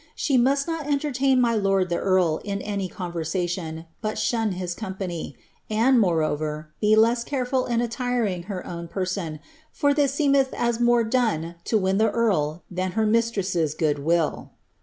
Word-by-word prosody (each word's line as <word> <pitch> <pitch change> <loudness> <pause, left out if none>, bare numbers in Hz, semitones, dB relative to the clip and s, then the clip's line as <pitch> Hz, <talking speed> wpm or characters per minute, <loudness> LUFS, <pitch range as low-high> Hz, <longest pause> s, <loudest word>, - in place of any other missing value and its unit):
She 280 - 0
mnst 270 +3 +3
not 325 -3 -4
enlerlain 275 -2 +1
mv 230 -3 +2
lord 195 -2 +1
ihe - - 0
nrl 185 -5 +2
in 200 -1 -3
any 200 -3 -3
c - - -20 1.1
but 215 0 -2
fhun 220 -2 0
hts 175 -2 -3
company; 190 -5 -5 0.3
and, 235 +4 +4
moreover, 155 -4 0
be 215 0 +5
less 230 +2 +4
canful 255 -1 -1
in 235 -1 +1
utirtiic 235 -7 -1
her 190 -2 -5
own 170 -1 -6
person, 180 -4 -3 0.3
for 285 -1 +2
ihu 290 -1 +3
seemelti 275 -1 +2 0.2
ea - - +1
more 240 -1 +4
done 220 -9 0
to 225 - +2
win 190 0 +1
Uie 220 -1 +3
earl 175 -9 +1
thanbtr 185 +4 0
mistress' 195 -8 +1
good 150 -3 0
will." 165 +1 0
210 Hz, 160 wpm, -24 LUFS, 175-240 Hz, 1.1 s, be